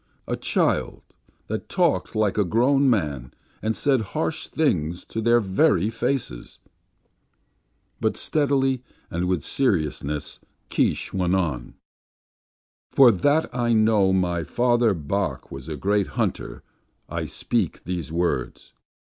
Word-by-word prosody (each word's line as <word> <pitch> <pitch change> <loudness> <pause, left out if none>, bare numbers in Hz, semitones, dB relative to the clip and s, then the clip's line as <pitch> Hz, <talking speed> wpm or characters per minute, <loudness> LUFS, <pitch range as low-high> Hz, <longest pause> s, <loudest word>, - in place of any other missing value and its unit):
A - - -1
child, - - 0 0.4
that - - -5
talked - - +1
like 110 -2 +1
a 105 - +3
grown 130 +8 +3
man, 75 - -1 0.3
and 110 +1 -1
said 135 -4 +2 0.2
harsh 160 0 -2
things 90 - 0
to 110 - -4
their 120 +1 +4
very 100 -1 +2
faces! 115 - -3 1.4
But - - 0
steadily 135 -3 +1 0.3
and 90 0 -1
with 90 -5 0
seriousness, 75 - -1 0.3
Keesh - - 0
went 90 -1 +1
on. 80 -10 -2 1.1
"For 130 -3 +7
that 145 - +1
I 120 -1 +1
know 110 -3 +4
my 90 -3 +1
father, 120 0 +2
Bok, 95 +6 -3
was 70 +3 -8
a 75 - -4
great 100 +5 +1
hunter, - - -2 0.4
I - - -3
speak - - -2
these 85 -4 -4
words. 85 +1 -2
100 Hz, 120 wpm, -24 LUFS, 85-120 Hz, 1.4 s, For